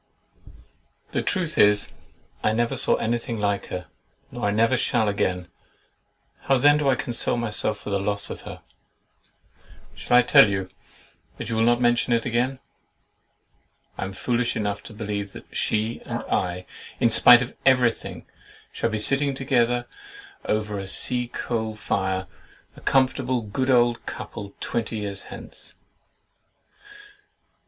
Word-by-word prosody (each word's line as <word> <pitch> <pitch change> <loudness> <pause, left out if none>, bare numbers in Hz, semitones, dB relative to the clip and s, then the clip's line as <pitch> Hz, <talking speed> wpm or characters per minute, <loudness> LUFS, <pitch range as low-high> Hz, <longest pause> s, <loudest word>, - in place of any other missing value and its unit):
The - - 0
truth 170 -5 -1
is, 105 0 +4 0.5
I 110 - +1
never 120 +1 0
saw - - +2
anything 115 0 -2
like 100 -1 -1
her, 90 -1 -5 0.5
nor - - -4
I - - +2
never 115 +4 +3
shall 120 -2 +1
again. 90 -3 -1 1.0
How 135 - +3
then 145 +3 +5
do 145 -2 +2
I 130 - +4
console 120 0 -2
myself 110 -2 -1
for - - -7
the 100 - +1
loss 100 +1 -2
of - - -7
her? - - -10 1.3
Shall 125 - +2
I 125 - +6
tell 110 - +7
you, 95 -1 -2 0.7
but - - -6
you 115 - -1
will 110 - +1
not 120 +1 +3
mention 120 0 +2
it 115 -1 +1
again? 125 +2 0 1.4
I - - -4
am 95 - -6
foolish 120 +4 -1
enough 105 -2 -2
to 115 - -9
believe 105 -2 -4
that - - -13
she 110 +2 -1
and - - -4
I, 90 0 -2 0.3
in 115 - +3
spite 120 +2 +8
of 125 - -9
every 130 -3 +5
thing, - - -10 0.5
shall - - -1
be 110 - -2
sitting 135 +5 +2
together 120 -2 +1 0.6
over 105 -1 -1
a 95 - -6
sea 125 +5 +2
coal 110 -2 -3
fire, 95 -2 -1 0.5
a - - -14
comfortable 130 -1 +1
good 130 +6 -2
old 120 -2 +3
couple, 100 -1 -7
twenty 115 -1 -2
years 100 -2 -5
hence! - - -9
115 Hz, 145 wpm, -24 LUFS, 105-125 Hz, 1.4 s, spite